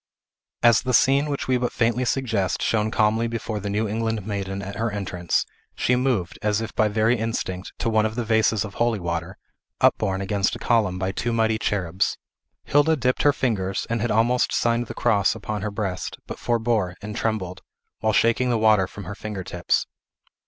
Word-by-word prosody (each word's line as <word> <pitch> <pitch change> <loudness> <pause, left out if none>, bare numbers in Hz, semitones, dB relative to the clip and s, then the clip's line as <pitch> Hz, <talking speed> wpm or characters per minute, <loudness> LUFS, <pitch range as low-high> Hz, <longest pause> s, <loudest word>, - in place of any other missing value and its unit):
As 120 -2 +6
the 125 -2 +1
scene 140 +2 +4
which 140 - -3
we 130 -1 +3
but 125 - -1
faintly 120 +1 +1
suggest 115 -8 0
shone 110 -1 +1
calmly 110 +2 +2
before 115 -2 -3
the 100 0 -4
New 105 +2 0
England 110 -1 -2
maiden 100 -2 -3
at 100 +1 -6
her 115 +1 0
entrance, 90 -4 -1 0.3
she 125 - +2
moved, 125 -9 -1
as 105 0 +1
if 115 -1 -5
by 110 - +3
very 110 +3 +2
instinct, 100 -5 -3
to - - -2
one 110 -1 +3
of 110 - -7
the 120 - -1
vases 110 -1 +2
of 100 - -8
holy 120 -3 +1
water, 85 -2 -4 0.4
upborne 95 -1 +2
against 100 +1 0
a - - -5
column 105 -6 +1
by 95 +1 -1
two 120 +5 -2
mighty 110 -1 +1
cherubs. 95 -3 -1 0.5
Hilda 145 +3 +3
dipped 125 -2 0
her 145 - +5
fingers, 105 -9 -1
and 115 -1 0
had 120 - 0
almost 120 +3 +2
signed 120 0 +1
the - - -7
cross 105 0 +2
upon 105 -1 -4
her 105 - -2
breast, 100 -3 -4
but - - -7
forbore, 110 -6 0
and 105 0 -6
trembled, 95 -6 -2 0.4
while 110 - +1
shaking 115 +3 +2
the 120 - +2
water 110 -4 +4
from 100 - -9
her 95 +3 -6
finger 105 -2 -6
tips. 90 -1 0
110 Hz, 195 wpm, -24 LUFS, 100-115 Hz, 0.5 s, As